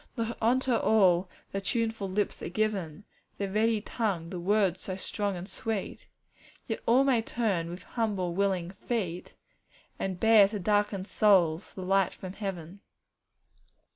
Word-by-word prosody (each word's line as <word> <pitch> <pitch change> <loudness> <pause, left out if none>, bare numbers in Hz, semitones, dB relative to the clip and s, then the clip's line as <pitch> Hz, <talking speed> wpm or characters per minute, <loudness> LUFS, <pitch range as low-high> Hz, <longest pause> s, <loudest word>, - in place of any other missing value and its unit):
'Not 230 0 -2
unto 255 +3 +2
all 190 -6 +3 0.2
the 195 - -3
tuneful 225 -1 -1
lips 205 +2 -1
are - - -4
given, 195 -4 -2 0.3
The 200 - -2
ready 215 +2 +1
tongue, 195 -8 -2
the 180 - -4
words 190 -1 +1
so 185 - -4
strong 200 +1 -2
and 175 +2 -7
sweet; 220 -2 -4 0.6
Yet 225 - -3
all 250 +4 +5
may 260 -4 +3
turn, 205 -8 -1
with 175 +2 -8
humble, 200 -7 -2
willing 185 -2 0
"feet," 190 -4 -4 0.6
And 190 -2 -3
bear 220 -2 +7
to 210 +1 -4
darkened 205 -1 0
souls 185 -6 +3
the 185 - -6
light 195 0 +2
from 185 -1 -8
heaven. 195 -3 -6
200 Hz, 145 wpm, -29 LUFS, 185-220 Hz, 0.6 s, bear